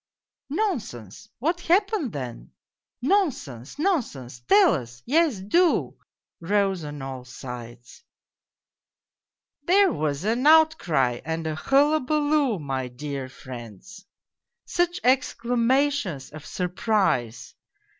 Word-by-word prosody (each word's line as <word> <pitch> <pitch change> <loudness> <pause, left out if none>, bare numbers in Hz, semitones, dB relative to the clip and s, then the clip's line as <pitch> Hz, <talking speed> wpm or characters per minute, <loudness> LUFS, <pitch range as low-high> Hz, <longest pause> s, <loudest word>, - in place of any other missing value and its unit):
" - - -68
Nonsense! 225 - -3
What 330 +7 -1
happened 380 - +1
then? 120 - -7
" - - -68
" - - -64
Nonsense, 250 - -1
nonsense! 230 - -2
Tell 205 +1 +6
us! 125 0 -6
Yes, 305 -3 +2
do," 335 - +2 0.4
rose 195 0 0
on 145 -2 -7
all 130 -1 -6
sides. 120 - -10 0.8
" - - -62
There 390 +2 +5
was 150 0 -2
an 235 +7 +1
outcry 180 - +4
and 160 +1 -3
a 160 - -1
hullabaloo, 290 - +2
my 135 -4 -3
dear 135 +1 -6
friends! 130 - -11 0.6
Such 350 +1 0
exclamations 245 - +1
of 155 0 -10
surprise 180 - -1
195 Hz, 105 wpm, -25 LUFS, -, 0.8 s, Tell